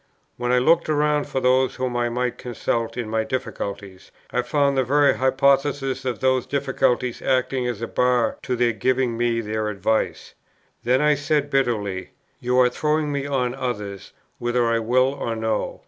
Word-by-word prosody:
When 120 0 -2
I 125 - +4
looked 165 +7 +3
round 150 -1 +1
for 130 - -2
those 130 0 +2
whom 130 -1 -3
I 120 0 +1
might 125 +1 -2
consult 115 -2 -3
in 120 -3 -3
my 110 0 0
difficulties, 100 -5 -5 0.2
I - - +1
found 140 -2 +1
the 130 - +2
very 140 -1 +3
hypothesis 135 0 +1
of 125 -3 -2
those 130 -1 +2
difficulties 130 -3 0
acting 130 -1 0
as 115 -2 -4
a - - -2
bar 125 -1 +1
to 125 - -2
their 120 -1 +2
giving 125 +2 0
me 120 0 0
their 110 0 -2
advice. 105 +2 -1 0.5
Then 125 +3 +2
I 150 0 +4
said, 145 0 0
bitterly, 105 -8 -1 0.3
"You 125 +1 +1
are 125 - +5
throwing 150 +2 0
me 140 0 -2
on 125 -3 0
others, 105 -7 -5 0.3
whether 120 0 +1
I 115 0 +2
will 130 +4 +2
or 115 -4 -3
no." 110 -1 -2
125 Hz, 175 wpm, -23 LUFS, 115-135 Hz, 0.5 s, are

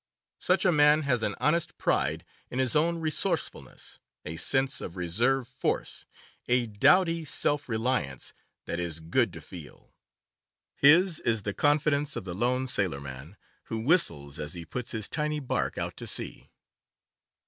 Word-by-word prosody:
Such - - +2
a 185 - +5
man 150 0 +5
has 125 -4 +1
an 105 -2 -1
honest 150 +7 +1
pride - - 0 0.2
in - - -6
his 130 0 +2
own 170 +3 +2
resourcefulness, 155 -2 -3 0.3
a 80 - -4
sense 135 +5 +1
of 85 - -6
reserve 120 +9 +1
force, 125 - -3 0.4
a 125 0 +2
doughty 165 - +3
self 145 0 0
reliance 110 - -2 0.3
that 85 - -3
is 85 -2 -3
good 80 +1 +1
to - - -9
feel. - - -12 0.8
His 165 +4 +5
is 115 -3 0
the 100 - -2
confidence 145 +1 +1
of - - -4
the 90 -2 -6
lone 125 +6 0
sailorman, 75 - -3 0.3
who 115 - -4
whistles 100 - +1
as 75 +1 -5
he 85 -1 -7
puts 125 +5 -5
his 110 -3 -3
tiny 150 0 -2
bark 135 - -2
out - - -4
to - - -7
sea. - - -4
125 Hz, 150 wpm, -28 LUFS, 95-150 Hz, 0.8 s, a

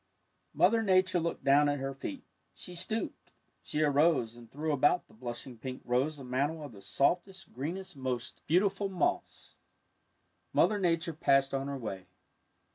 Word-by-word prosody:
'' - - -45
Mother 230 -1 +4
Nature 185 -3 +3
looked 170 0 -3
down 145 +1 +5
at 145 - 0
her 135 0 -3
feet. 270 - -6 0.3
She 180 - -8
stooped. 185 +6 -3 0.3
She 155 - -1
arose 145 -5 +3
and 120 -1 -14
threw 155 +3 -2
about 145 +5 +3
the - - -21
blushing 120 +1 -7
pink 130 +1 -6
rose 130 +5 +1
a 140 - -9
mantle 140 +5 -1
of 145 - -8
the 100 -3 -13
softest, 180 - 0
greenest, 175 +7 -5
most 130 -3 -4
beautiful 195 +4 +2
moss. 185 -2 -2 1.0
Mother 210 -1 +4
Nature 170 -2 +1
passed 135 -3 +3
on 135 0 -1
her 140 -1 -3
way. 95 -7 -6
145 Hz, 160 wpm, -31 LUFS, 130-180 Hz, 1.0 s, down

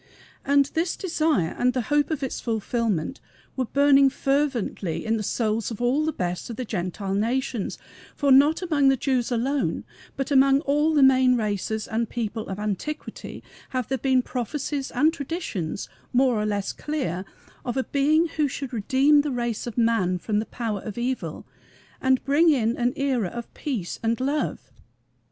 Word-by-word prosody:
And 280 0 +4
this 330 +2 0
desire 310 - 0
and 250 0 +3
the 255 - 0
hope 295 0 +3
of 305 -4 -2
its 265 - -3
fulfillment 225 - -1 0.4
were 260 - 0
burning 275 +1 +5
fervently 260 - -1
in 225 0 +1
the 220 - -2
souls 220 0 -1
of 225 - -6
all 255 +6 +2
the 315 - +1
best 180 - -3
of 230 - -5
the 255 - -4
Gentile 190 -1 -3
nations; 235 +2 -1 0.4
for 280 -1 +2
not 290 +6 +5
among 300 -6 +2
the 270 0 +4
Jews 255 -1 0
alone, 260 +4 0 0.3
but 270 +2 -3
among 275 0 +5
all 300 +1 +2
the 285 - +5
main 260 -1 +5
races 215 0 -2
and 225 0 -1
peoples 225 -2 -3
of 190 - -5
antiquity, 210 +9 -5 0.3
have 255 -3 -3
there 265 -1 -1
been 260 -2 +2
prophecies 275 +3 -3
and 315 +2 +2
traditions 275 - -4 0.3
more 255 0 +4
or 210 - -1
less 205 -2 -2
clear 260 - -3 0.4
of 245 +1 -3
a 265 - +1
Being 305 +5 +2
who 300 -2 +3
should 270 -1 -6
redeem 265 +7 +4
the 295 - -3
race 240 -3 -2
of 240 - -6
man 225 -6 +2
from 210 +3 -1
the 220 - -3
power 220 -5 -3
of 215 0 -7
evil 250 +2 -3 0.6
and 260 -1 +2
bring 295 +5 +4
in 240 -6 +2
an 245 +1 0
era 265 -7 0
of 235 +5 -8
peace 240 - -4
and 230 0 0
love. 280 +4 -2
255 Hz, 175 wpm, -25 LUFS, 220-280 Hz, 0.6 s, burning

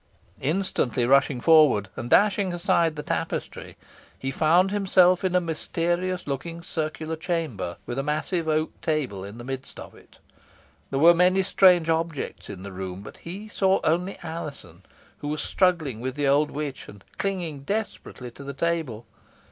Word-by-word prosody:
Instantly 145 -6 0
rushing 135 0 +3
forward 150 -9 +5
and 120 - -5
dashing 200 0 +4
aside 170 -3 +2
the 150 - -5
tapestry, - - -4 0.4
he 135 - -3
found 170 +7 +3
himself 185 -3 +4
in 185 -1 0
a - - +6
mysterious 175 +2 -2
looking 165 +5 -5
circular 160 -1 -3
chamber, 155 - -3
with 120 +2 -4
a - - -1
massive 155 +3 -1
oak 155 0 +1
table 140 - -1
in 100 +3 -9
the 120 - -8
midst 135 +1 -7
of - - -10
it. - - -19 0.7
There 135 - -2
were 165 +5 +7
many 180 +2 +3
strange 180 -3 +5
objects 165 -2 -2
in 95 -2 -8
the 100 - -7
room, 95 0 -6
but - - -11
he 195 +6 -8
saw 195 -2 +2
only 180 +4 0
Alizon, 145 - -7 0.4
who 145 - -6
was 150 +1 -2
struggling 165 - +1
with 130 +1 -3
the 145 -1 0
old 145 +2 +3
witch, 145 -2 -5
and 100 -1 -13 0.2
clinging 180 -7 -2
desperately 140 - -5
to 140 - -12
the 140 0 -6
table. 160 -9 -2
155 Hz, 165 wpm, -25 LUFS, 135-175 Hz, 0.7 s, were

